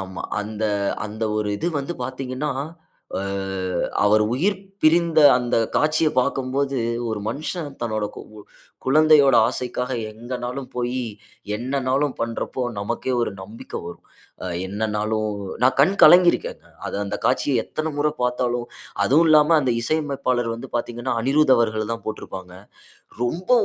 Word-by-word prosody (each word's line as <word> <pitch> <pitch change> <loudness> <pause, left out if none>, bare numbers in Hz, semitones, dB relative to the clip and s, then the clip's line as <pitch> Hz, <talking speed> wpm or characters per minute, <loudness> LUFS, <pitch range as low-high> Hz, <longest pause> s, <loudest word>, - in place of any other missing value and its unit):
ஆமா. 95 0 -7 0.2
அந்த, 110 +1 -4 0.4
அந்த 110 +1 -4
ஒரு 105 -1 -1
இது 170 - 0
வந்து 155 +6 -5
பார்த்தீங்கன்னா, 130 +2 -3 0.7
அ, - - -3 0.8
அவர் 105 +1 +5
உயிர் 190 +10 +1 0.2
பிரிந்த 165 0 +4 0.2
அந்த 120 -1 -1 0.2
காட்சிய 155 +1 +3
பாக்கும்போது, 135 +1 -1 0.3
ஒரு 110 - -3
மனுஷன் 150 +4 -4
தன்னோட 110 -2 -1
கு - - -6 0.6
குழந்தையோட 145 -1 +5
ஆசைக்காக 125 0 -3 0.2
எங்கனாலும் 125 +3 -5
போயி, 125 +1 -1 0.6
என்னனாலும் 130 +3 0
பண்ணுறப்போ, 115 +2 -3 0.2
நமக்கே 120 +5 -2
ஒரு - - -1
நம்பிக்கை 110 +4 -8
வரும். 85 - -10 0.4
அ - - -4 0.2
என்னனாலும் 110 +1 -1 0.4
நான் 130 - +4
கண் 175 +8 +4
கலங்கி 175 0 +9
இருக்கேன். - - -5 0.2
அது - - -4
அந்த 100 - -3
காட்சிய 130 -2 +2
எத்தனை 155 0 -3
முறை 150 +1 +2
பாத்தாலும் 125 -1 0 0.4
அதுவும் 155 +5 +4
இல்லாம 155 +1 +6
அந்த 130 -3 +1
இசையமைப்பாளர் 135 -5 0
வந்து 115 - -9
பார்த்தீங்கன்னா, 120 +1 -3
அனிரூத் 140 +1 +4
அவர்கள் 110 -1 0
தான் 115 - -6
போட்டிருப்பாங்க. 95 -4 -7 0.7
ரொம்ப 170 - -3
125 Hz, 130 wpm, -22 LUFS, 115-145 Hz, 0.8 s, கலங்கி